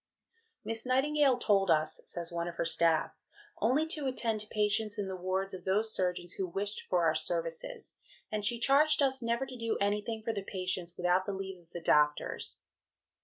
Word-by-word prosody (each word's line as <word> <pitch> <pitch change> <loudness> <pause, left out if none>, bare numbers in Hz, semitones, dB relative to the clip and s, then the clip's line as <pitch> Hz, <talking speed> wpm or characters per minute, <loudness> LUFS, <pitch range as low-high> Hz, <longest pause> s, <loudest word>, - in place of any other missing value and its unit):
"Miss 225 0 -2
Nightingale 270 +1 +3
told 200 -5 +2
us," 155 -1 +2
says 170 -1 -4
one 170 0 -2
of 170 - -5
her 170 - -1
staff, 165 -1 +2 0.5
"only 260 +8 +2
to 300 -4 +1
attend 230 -4 0
to 210 - -8
patients 210 0 0
in 205 -2 -2
the 190 - -4
wards 190 +2 -2
of 185 -1 -7
those 210 +4 +1
surgeons 180 -1 -1
who 190 - -3
wished 200 +4 -2
for 175 -2 +2
our 160 - +4
services, 165 - -3 0.3
and 210 -1 -2
she 235 +3 +1
charged 290 +4 +4
us 265 -1 +1
never 235 +3 0
to 260 - -8
do 230 -2 -1
anything 210 +2 -1
for 225 - -1
the 200 - -3
patients 185 -2 -3
without 180 +1 +2
the 200 - -1
leave 190 -1 -6
of 170 -1 -23
the 175 - -7
doctors." 150 -2 +1
200 Hz, 190 wpm, -31 LUFS, 175-230 Hz, 0.5 s, our